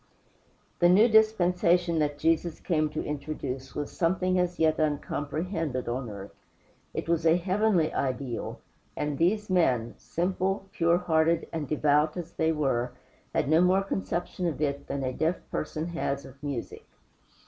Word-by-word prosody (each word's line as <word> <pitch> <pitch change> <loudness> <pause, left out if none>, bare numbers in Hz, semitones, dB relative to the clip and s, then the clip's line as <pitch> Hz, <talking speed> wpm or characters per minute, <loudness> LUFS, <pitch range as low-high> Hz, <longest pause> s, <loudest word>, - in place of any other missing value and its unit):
The 175 - +5
new 205 +6 +6
dispensation 180 -6 +3
that 145 -1 0
Jesus 165 +1 +1
came 155 -3 0
to - - -4
introduce 140 -3 -5
was 145 -1 -3
something 185 +1 +1
as 180 0 0
yet 155 0 +2
uncomprehended 150 -1 -2
on 120 0 -3
earth. 100 -1 -9 0.6
It - - -4
was 165 -1 +1
a 165 +1 +5
heavenly 185 -2 +1
ideal, 130 -2 -3 0.4
and 150 -1 -1
these 210 +5 +2
men 125 -11 +2
simple, 190 +3 -1
pure 170 +1 +3
hearted, 165 -1 +2
and 155 -3 -3
devout 150 +2 +2
as 170 -1 -6
they 160 0 +1
were 135 -6 0 0.4
had - - +1
no 160 +3 +5
more 185 +2 +4
conception 180 -2 -2
of 160 - -3
it 140 -2 -2
than 140 - -3
a 130 0 -1
deaf 160 +6 +1 0.2
person 155 +1 -3
has 140 -5 -2
of 135 +1 -14
music. 140 -5 -5
160 Hz, 150 wpm, -28 LUFS, 145-180 Hz, 0.6 s, new